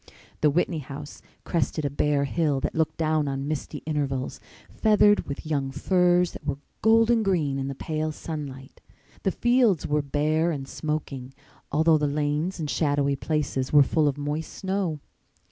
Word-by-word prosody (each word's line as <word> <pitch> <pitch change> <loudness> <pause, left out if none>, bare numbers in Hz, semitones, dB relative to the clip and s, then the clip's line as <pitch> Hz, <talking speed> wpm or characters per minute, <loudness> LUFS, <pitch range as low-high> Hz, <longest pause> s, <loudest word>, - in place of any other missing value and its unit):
The 150 - +5
Whitney 165 +1 0
house 145 +1 -9 0.2
crested 155 -2 -1
a 140 - -1
bare 145 0 +1
hill 145 -1 0
that - - -2
looked 160 -1 0
down 155 -2 +1
on 135 0 -3
misty 155 -2 -4
intervals, 140 -4 -2 0.3
feathered 210 -1 +3
with 140 - -6
young 140 -3 -1
firs 180 +3 +2
that - - -10
were 140 -2 -2 0.2
golden 225 +1 +4
green 160 -9 0
in 135 - -2
the 140 - -4
pale 155 +2 -2
sunlight. 145 -4 -7 0.4
The - - +1
fields 240 - +3
were 150 0 +1
bare 155 +3 +1
and 140 -5 -3
smoking, 140 -5 -4 0.4
although 155 +1 +4
the 150 - +1
lanes 150 +5 -1
and 155 - -2
shadowy 145 -2 +1
places 140 -3 -2
were 145 -1 +7
full 155 +2 +2
of 140 -1 0
moist 150 +2 -3
snow. 190 -6 -2
150 Hz, 160 wpm, -26 LUFS, 140-165 Hz, 0.4 s, were